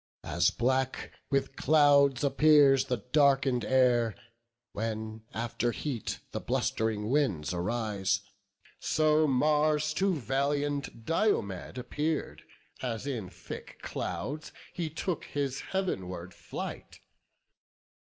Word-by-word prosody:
As - - +2
black 130 +2 0 0.2
with 135 -1 0
clouds 145 -3 +4
appears 140 -1 +5
the 120 -5 -3
darken'd 135 -4 +4
air, 120 -2 +3 0.6
When 110 0 -4
after 120 +1 -1
heat 125 -4 -4
the - - -4
blust'ring 110 -2 -1
winds 95 - +1
arise, 100 +1 -1 0.6
So 155 0 +3
Mars 150 +2 +2
to 190 +3 +1
valiant 140 -1 -1
Diomed 130 - 0
appear'd, 150 +5 -2 0.4
As 120 -1 -3
in 120 -10 -3
thick 90 -1 -9
clouds 150 +3 -4 0.2
he 170 -3 -3
took 165 +2 -3
his 140 -2 -2
heav'nward 95 - -3
flight. - - -7
135 Hz, 100 wpm, -30 LUFS, 110-150 Hz, 0.6 s, appears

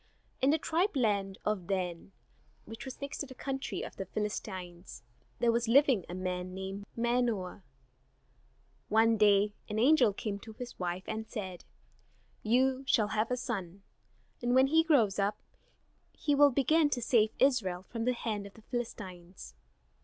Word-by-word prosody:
In 265 - +4
the 310 - +4
tribe 340 +4 0
land 200 -6 0
of 210 -5 -1
Dan, 185 -2 -3 0.5
which 225 +3 -9
was 265 - -8
next 280 0 -5
to 285 - -3
the 260 - -11
country 270 +1 -4
of - - -8
the 195 - -5
Philistines, 185 - -5 0.3
there 235 -1 +3
was 235 0 0
living 255 - +4
a 175 - -5
man 185 0 -3
named 190 +1 -6
Manoah. 235 -6 0 1.3
One 225 +1 +4
day 205 -1 +4 0.2
an 210 - -3
angel 250 -1 +5
came 200 0 -4
to 220 +2 -11
his 245 +2 -9
wife 180 0 -3
and 220 0 -4
said: 190 -6 -6 0.8
"You 260 +4 +2
shall 215 -5 +3
have 215 +1 0
a 250 - 0
son, 195 -6 -5 0.6
and 245 +1 +1
when 260 +1 +6
he 320 +4 +4
grows 235 - +3
up 200 +1 +1 0.8
he 290 - 0
will 285 0 +7
begin 290 +4 +3
to 250 -4 -2
save 225 -3 +4
Israel 210 -10 +2
from 230 -1 -4
the 250 - +2
hand 215 -4 -3
of 200 - -16
the 220 - -16
Philistines. 190 -7 -6
220 Hz, 160 wpm, -31 LUFS, 195-255 Hz, 1.3 s, will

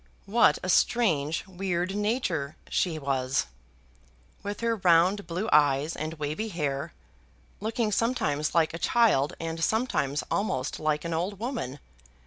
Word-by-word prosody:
What 200 -6 +4
a - - -3
strange, 165 -9 +2
weird 185 -1 -2
nature 205 - -1
she 170 -4 0
was, 135 -2 0 1.0
with 205 +1 -5
her 230 -1 +1
round 185 +2 +3
blue 180 +6 -2
eyes 145 +1 +3
and 155 +2 -4
wavy 150 +8 -3
hair, 150 -5 -3 0.7
looking 220 +1 -1
sometimes 200 - 0
like 160 -2 +3
a 165 - -5
child 210 - +3
and 165 0 -3
sometimes 190 - 0
almost 150 -10 -1
like 155 0 0
an 170 - -2
old 180 +5 -2
woman! 215 - -4
170 Hz, 130 wpm, -27 LUFS, 150-210 Hz, 1.0 s, What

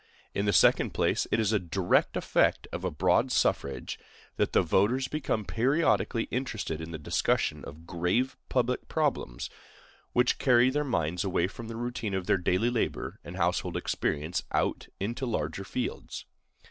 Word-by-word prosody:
In 100 - 0
the - - +4
second 90 - +4
place, - - +1
it 115 - +2
is 110 -1 +2
a 105 - +3
direct 90 +1 +1
effect - - +2
of - - -5
a - - +1
broad - - +2
suffrage 70 -1 0 0.4
that - - +1
the - - +4
voters 125 +7 +2
become 130 -8 -2
periodically 120 - +2
interested 110 -10 -3
in 80 - -6
the 80 - -5
discussion 75 - 0
of 80 +3 -10
grave 90 +11 0
public 125 0 0
problems, 145 - -1 0.6
which 125 0 +2
carry 125 -1 +5
their 150 +2 0
minds 85 - -1
away 90 -3 +1
from 115 +5 -7
the 115 - -6
routine 115 -3 -3
of 95 -1 -2
their 95 - +2
daily 95 +7 +1
labor 120 - -2
and 90 +2 -8
household 90 0 0
experience 80 +3 -1
out - - 0
into 120 +6 -2
larger 115 - -2
fields. - - -4
105 Hz, 160 wpm, -29 LUFS, 90-125 Hz, 0.6 s, carry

